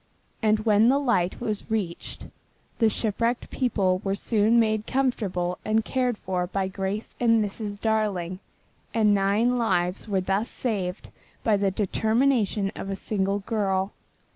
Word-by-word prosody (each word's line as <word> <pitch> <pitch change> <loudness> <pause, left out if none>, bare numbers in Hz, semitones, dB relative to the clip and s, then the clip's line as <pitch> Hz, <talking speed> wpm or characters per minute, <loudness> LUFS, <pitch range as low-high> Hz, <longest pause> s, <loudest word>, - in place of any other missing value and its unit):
And 215 -1 +3
when 215 +1 +5
the 270 - +4
light 235 -11 +1
was 215 -4 -3
reached, 200 -6 -3 0.5
the 225 -2 +5
shipwrecked 230 +3 -1
people 195 -8 +1
were 195 0 0
soon 220 +2 +3
made 215 -1 +1
comfortable 195 -10 -1
and 220 0 +1
cared 250 -3 0
for 180 -2 -2
by 195 0 -1
Grace 195 +3 -4
and 230 -3 +4
Mrs. 205 0 -6
Darling, 205 -5 -1 0.6
and 215 -2 +4
nine 205 +5 +2
lives 185 -5 0
were 200 -3 +1
thus 195 +5 -1
saved 200 -6 -3 0.3
by 220 - +3
the 200 -1 +1
determination 220 +1 +1
of 195 - -6
a 195 - -2
single 200 0 -1
girl. 195 -2 0
210 Hz, 140 wpm, -26 LUFS, 195-225 Hz, 0.6 s, when